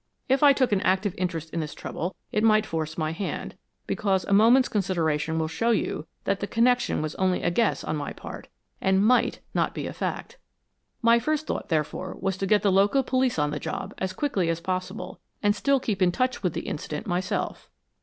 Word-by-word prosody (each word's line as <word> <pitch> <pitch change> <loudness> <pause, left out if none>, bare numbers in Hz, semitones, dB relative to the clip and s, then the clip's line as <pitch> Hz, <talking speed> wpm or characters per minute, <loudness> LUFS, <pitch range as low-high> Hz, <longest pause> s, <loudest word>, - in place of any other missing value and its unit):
If 265 +1 +2
I 290 -1 +8
took 260 -3 +2
an 200 -2 +2
active 190 +1 +1
interest 165 -3 -3
in 170 - -2
this 155 -2 -4
trouble 175 +3 -4 0.2
it 215 - +1
might 215 -1 +4
force 160 -3 -3
my 155 -1 -1
hand, 185 +4 -4 0.3
because 195 -3 0
a 200 - 0
moment's 235 +5 +6
consideration 160 -6 0
will 160 -1 0
show 230 +9 -1
you 205 -8 0 0.2
that 195 0 0
the 205 - -3
connection 245 -6 +2
was 155 0 -3
only 185 -1 +1
a 175 - +2
guess 215 +5 +1
on 155 - -2
my 145 - -4
part, - - -9 0.3
and 190 +1 +3
MIGHT 250 +3 +3
not - - 0
be - - -3
a - - -5
fact. 480 - -4 0.6
My 230 0 +6
first 310 +5 -1
thought, - - -4
therefore, 160 +3 -2
was 195 -1 -1
to 195 - -2
get 210 +1 +3
the 200 - +4
local 200 +8 +4
police 255 -3 +1
on 150 -1 +1
the 150 - -3
job - - -5
as 190 0 -1
quickly 195 - -1
as 165 0 0
possible 185 +3 -4 0.2
and 205 0 +3
still 275 +5 +2
keep 210 -6 -2
in 180 -1 +4
touch 255 +6 -1
with 180 -5 0
the - - -3
incident 150 0 -5
myself." 185 +3 -2
190 Hz, 210 wpm, -26 LUFS, 165-230 Hz, 0.6 s, I